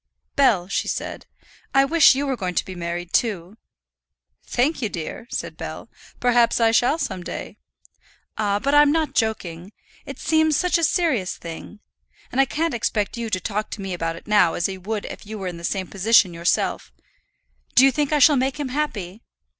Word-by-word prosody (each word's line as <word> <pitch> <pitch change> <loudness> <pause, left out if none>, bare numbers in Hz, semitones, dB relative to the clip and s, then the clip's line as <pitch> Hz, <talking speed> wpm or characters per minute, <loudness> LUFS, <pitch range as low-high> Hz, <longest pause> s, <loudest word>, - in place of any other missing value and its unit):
"Bell," 215 -11 +3
she - - -2
said, - - -4 0.5
"I 270 0 +6
wish 320 -1 +6
you 280 +2 -1
were 270 -2 -1
going 185 -6 -4
to - - +1
be 190 - -7
married 175 0 -5
too." 205 -3 -1 0.9
"Thank'ye, 260 -1 0
dear," 175 +7 -6
said - - -4
Bell. - - -7 0.3
"Perhaps 245 -1 +3
I 225 -1 +4
shall 245 +6 +3
some 185 - -3
day." - - -7 0.8
"Ah; 205 -2 0
but 275 +7 -1
I'm 290 0 +6
not 315 -2 0
joking. 190 -5 -2 0.4
It 275 -1 -7
seems 315 -1 +2
such 360 0 +2
a - - -2
serious 300 - +1
thing. 170 +5 -9 0.5
And 265 - +3
I - - +4
can't 320 +5 -1
expect 215 -3 -1
you 235 -1 -4
to 185 - -1
talk 210 +3 -3
to 205 - -7
me 195 -1 -4
about 165 -1 -2
it - - -12
now 205 -6 +3
as 170 - 0
you 190 -1 -7
would 210 +2 -3
if - - -9
you 215 0 -6
were 190 -2 -5
in 175 -1 -5
the 170 - -11
same 190 +2 -2
position 195 -1 +3
yourself. 170 +1 -1 0.8
Do 260 - +8
you 270 - +5
think 295 +1 -1
I 300 - +3
shall 290 +1 +6
make 265 +3 -1
him 285 -3 -3
happy?" 225 -9 -3
220 Hz, 195 wpm, -22 LUFS, 185-275 Hz, 0.9 s, Do